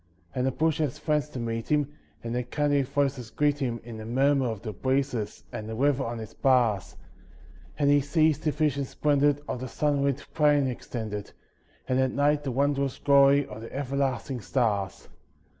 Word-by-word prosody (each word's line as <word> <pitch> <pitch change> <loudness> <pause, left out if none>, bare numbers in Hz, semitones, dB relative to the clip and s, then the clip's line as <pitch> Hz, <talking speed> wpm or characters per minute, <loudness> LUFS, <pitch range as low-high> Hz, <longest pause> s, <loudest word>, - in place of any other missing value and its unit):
And 125 +1 0
the - - +2
bush 160 +3 0
has 150 -2 -1
friends 150 -1 0
to 130 - -8
meet 115 -1 -3
him, 145 -1 +1 0.3
and 115 0 -4
their 125 - 0
kindly 145 +3 +1
voices 135 -3 -1
greet 145 +2 +1
him 120 -4 -2
In 115 -1 -8
the 110 - -7
murmur 135 +2 +2
of 110 -4 -5
the 110 -3 -4
breezes 130 -5 -1
and 110 0 -6
the 110 - -4
river 140 +2 +2
on 115 -1 -4
its 110 -1 -8
bars, 120 -7 +2 0.8
And 145 -2 +2
he 145 0 +5
sees 155 +1 +2
the 155 - 0
vision 150 -1 0
splendid 145 +1 +1
of - - -3
the 130 - -5
sunlit 140 0 0
plain 145 -2 +4
extended, 110 -5 -5 0.5
And 130 0 +1
at 130 -1 +1
night 145 +1 +2
the 135 - -2
wondrous 140 +1 0
glory 140 0 +5
of 110 -2 -9
the 115 - -9
everlasting 135 -2 -2
stars. 100 -6 -1
135 Hz, 180 wpm, -27 LUFS, 120-145 Hz, 0.8 s, he